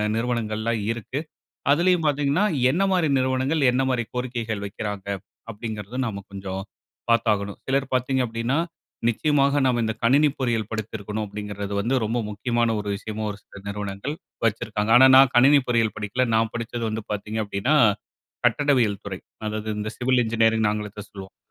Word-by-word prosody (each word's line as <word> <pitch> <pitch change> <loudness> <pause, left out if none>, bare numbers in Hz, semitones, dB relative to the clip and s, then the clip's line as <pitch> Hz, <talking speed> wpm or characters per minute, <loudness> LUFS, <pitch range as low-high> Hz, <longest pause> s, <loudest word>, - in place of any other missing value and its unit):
நிறுவனங்கள்லாம் 115 -1 -1
இருக்கு. 120 +4 -4 0.5
அதுலையும் 170 +1 +3
பாத்தீங்கன்னா, 145 +5 +2 0.3
என்ன 180 +6 +1
மாரி 175 -4 +2
நிறுவனங்கள், 130 +4 +1
என்ன 130 +2 +1
மாரி 120 -2 0
கோரிக்கைகள் 115 -4 -3
வைக்கிறாங்க? 100 -1 -5 0.4
அப்டிங்குறதும் 110 +3 -4
நாம 100 -3 -4
கொஞ்சம் 95 -1 -5 0.5
பார்த்தாகணும். 105 -4 +1
சிலர் 135 0 0
பார்த்தீங்க 130 +1 +1
அப்டின்னா, 115 +4 -1 0.5
நிச்சயமாக 140 +3 +2
நாம 125 -2 +2
இந்த 110 0 -1
கணினி 145 +5 +5
பொறியியல் 115 -5 0
படித்திருக்கணும் 110 -1 -4
அப்டிங்குறது 100 0 -6
வந்து 115 +6 0
ரொம்ப 115 +3 -1
முக்கியமான 120 +2 0
ஒரு 105 - -6
விஷயமாவும் 105 0 -5
சில - - -17
நிறுவனங்கள் 100 +6 -4 0.3
வச்சிருக்காங்க. 110 -1 0
ஆனா 130 +2 +9
நான் 135 -1 +7
கணினி 140 +4 +7
பொறியியல் 115 -3 +2
படிக்கல, 105 +4 -1
நான் 110 0 +2
படிச்சது 120 0 -4
வந்து 110 +1 -3
பார்த்தீங்க 105 +1 -3
அப்டின்னா, 100 +8 0 0.7
கட்டடவியல் 120 -5 +2
துறை. 95 -2 -5 0.3
அதாவது 110 0 -3
இந்த 105 +1 -3
சிவில் 125 0 +2
இன்ஜினியரிங் 110 -1 +2
ஆங்கிலத்துல 105 -1 -5
சொல்லுவோம்ல, 95 -1 -10
115 Hz, 140 wpm, -24 LUFS, 105-130 Hz, 0.7 s, ஆனா